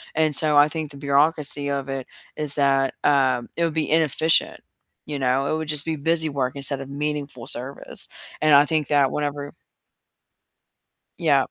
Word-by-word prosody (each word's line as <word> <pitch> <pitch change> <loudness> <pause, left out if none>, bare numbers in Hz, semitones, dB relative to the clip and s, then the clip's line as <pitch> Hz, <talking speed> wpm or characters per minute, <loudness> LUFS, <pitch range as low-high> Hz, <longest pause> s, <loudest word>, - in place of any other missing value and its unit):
and 155 -2 +1
so 150 -1 +4
I 145 +1 +6
think 155 -1 -5
the 140 - -12
bureaucracy 145 0 +1
of 140 -1 -3
it 135 -1 -5 0.3
is 150 -2 -3
that, 135 -2 +2
um, 130 -4 +2
it 170 - +1
would 165 - -2
be 160 -2 -1
inefficient, 160 0 +2 0.4
you 145 -2 -5
know? 130 +1 +1
It - - 0
would 160 -1 -5
just 150 -2 +2
be 160 - -2
busy 160 +2 +1
work 135 -3 -2
instead 140 0 -1
of 135 - -9
meaningful 145 -3 -4
service, 130 +3 -2 0.3
and 155 -1 +4
I 140 - +7
think 155 -1 -1
that 140 -2 +2
whenever 145 -1 -4 1.7
Yep. 145 -5 +2
145 Hz, 170 wpm, -23 LUFS, 140-155 Hz, 1.7 s, I